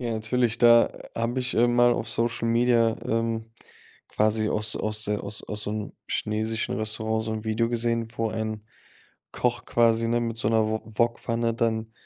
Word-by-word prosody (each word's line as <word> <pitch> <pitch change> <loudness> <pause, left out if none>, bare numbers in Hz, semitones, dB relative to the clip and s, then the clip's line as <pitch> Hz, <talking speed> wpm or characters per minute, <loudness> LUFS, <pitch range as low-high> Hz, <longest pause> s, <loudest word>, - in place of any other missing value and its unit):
Ja, 120 -2 -2
natürlich, 115 +1 0
da 120 0 +6 0.2
habe 115 +3 -1
ich 125 0 -2
mal, - - 0
ähm, 120 0 +1
auf 120 -2 +3
Social 115 0 0
Media, 115 -1 +3
ähm, 115 0 -1 0.6
quasi 110 0 +1
aus 105 0 -1
aus 110 0 -1
der 105 0 -1
aus 100 +1 -5
aus 105 -1 -6
so 105 - -3
'nem 105 -1 -4
chinesischen 110 +2 -2
Restaurant 110 0 -1
so 110 - -3
'n 110 0 -5
Video 110 +1 0
gesehen, 115 -1 -1
wo 115 -1 0
ein 110 -1 -4 0.7
Koch - - -1
quasi, 115 -1 +2
ne, 120 +1 +1
mit 115 -1 -3
so 110 - 0
'ner 110 -1 +3
Wo 110 0 -1
Wokpfanne 115 +1 0
dann, 110 -1 -1
115 Hz, 180 wpm, -26 LUFS, 110-115 Hz, 0.7 s, da